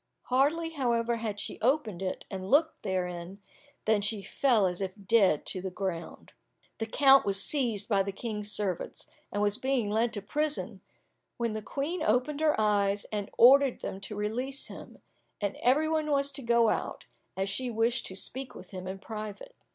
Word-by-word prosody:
Hardly, 300 Hz, +6 st, +2 dB
however, 235 Hz, -5 st, 0 dB
had 215 Hz, -3 st, -4 dB
she -, -, -4 dB
opened 235 Hz, -, +1 dB
it, 185 Hz, -1 st, -4 dB
and 190 Hz, -1 st, -5 dB
looked 315 Hz, +3 st, +3 dB
therein, 180 Hz, -1 st, -3 dB, 0.5 s
than 215 Hz, -1 st, +3 dB
she 205 Hz, 0 st, -2 dB
fell 235 Hz, -5 st, +2 dB
as 180 Hz, 0 st, -2 dB
if 190 Hz, -1 st, -2 dB
dead 195 Hz, -7 st, +4 dB
to 185 Hz, -, -1 dB
the 190 Hz, -, -3 dB
ground. 180 Hz, -3 st, -5 dB, 0.5 s
The 225 Hz, -, -2 dB
count 275 Hz, +3 st, +6 dB
was 200 Hz, -1 st, 0 dB
seized 235 Hz, -8 st, +1 dB
by 200 Hz, -3 st, +3 dB
the 200 Hz, +1 st, -2 dB
King's 210 Hz, 0 st, -3 dB
servants, 195 Hz, -5 st, -2 dB, 0.2 s
and 205 Hz, -, -1 dB
was 205 Hz, 0 st, +2 dB
being 260 Hz, -6 st, 0 dB
led 225 Hz, +2 st, +2 dB
to 205 Hz, -4 st, -4 dB
prison, 300 Hz, +7 st, -2 dB, 0.6 s
when 235 Hz, -2 st, -1 dB
the 215 Hz, -, -3 dB
Queen 285 Hz, -, -3 dB
opened 255 Hz, +7 st, +1 dB
her 305 Hz, -6 st, +2 dB
eyes, 205 Hz, -1 st, +2 dB
and 205 Hz, -2 st, -3 dB
ordered 270 Hz, +2 st, +6 dB
them 190 Hz, -, -5 dB
to 210 Hz, +2 st, -6 dB
release 245 Hz, +7 st, -3 dB
him, -, -, -12 dB, 0.4 s
and 205 Hz, -1 st, -2 dB
every 285 Hz, +6 st, +3 dB
one 315 Hz, -1 st, 0 dB
was 280 Hz, -1 st, +2 dB
to 275 Hz, 0 st, -2 dB
go 235 Hz, -2 st, +3 dB
out, -, -, -3 dB, 0.3 s
as 190 Hz, 0 st, 0 dB
she 245 Hz, +6 st, -2 dB
wished 230 Hz, +1 st, 0 dB
to 190 Hz, -, -7 dB
speak 260 Hz, +6 st, -1 dB
with 180 Hz, -, -12 dB
him 185 Hz, -1 st, -7 dB
in 190 Hz, +1 st, -5 dB
private. 215 Hz, -, -7 dB
220 Hz, 180 wpm, -29 LUFS, 200-265 Hz, 0.6 s, count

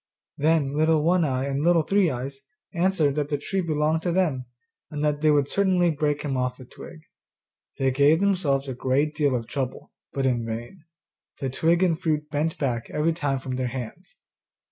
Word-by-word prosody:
Then 150 Hz, -2 st, +1 dB
Little 155 Hz, 0 st, +3 dB
One 175 Hz, +2 st, +3 dB
eye 130 Hz, -3 st, 0 dB
and 140 Hz, 0 st, -2 dB
Little 170 Hz, -1 st, +4 dB
Three 195 Hz, +1 st, +2 dB
eyes 135 Hz, +1 st, -5 dB, 0.3 s
answered 170 Hz, -5 st, +2 dB
that 145 Hz, 0 st, -2 dB
the 145 Hz, -, 0 dB
tree 190 Hz, +7 st, -2 dB
belonged 155 Hz, -1 st, 0 dB
to 175 Hz, -, -1 dB
them, 155 Hz, -9 st, 0 dB, 0.4 s
and 150 Hz, 0 st, -3 dB
that 150 Hz, 0 st, 0 dB
they 155 Hz, -, +4 dB
would 145 Hz, -2 st, +3 dB
certainly 185 Hz, -2 st, +2 dB
break 150 Hz, -1 st, -1 dB
him 140 Hz, -3 st, -2 dB
off 125 Hz, 0 st, -2 dB
a 130 Hz, -, -10 dB
twig. 160 Hz, +5 st, -12 dB, 0.8 s
They 135 Hz, 0 st, +1 dB
gave 145 Hz, +4 st, +4 dB
themselves 165 Hz, -9 st, +1 dB
a 130 Hz, -, -3 dB
great 135 Hz, +4 st, 0 dB
deal 145 Hz, -3 st, +1 dB
of 115 Hz, -2 st, -3 dB
trouble, 130 Hz, 0 st, -5 dB, 0.2 s
but 135 Hz, -1 st, -2 dB
in 120 Hz, -3 st, +1 dB
vain; 120 Hz, +10 st, -7 dB, 0.5 s
the 135 Hz, -2 st, -2 dB
twigs 170 Hz, +6 st, +2 dB
and 165 Hz, -3 st, 0 dB
fruit 150 Hz, -2 st, -1 dB
bent 155 Hz, +2 st, -1 dB
back 120 Hz, -5 st, -2 dB
every 160 Hz, +2 st, 0 dB
time 145 Hz, -4 st, -1 dB
from 130 Hz, -1 st, -5 dB
their 130 Hz, -1 st, -1 dB
hands. 125 Hz, -2 st, -7 dB
150 Hz, 190 wpm, -25 LUFS, 135-165 Hz, 0.8 s, Little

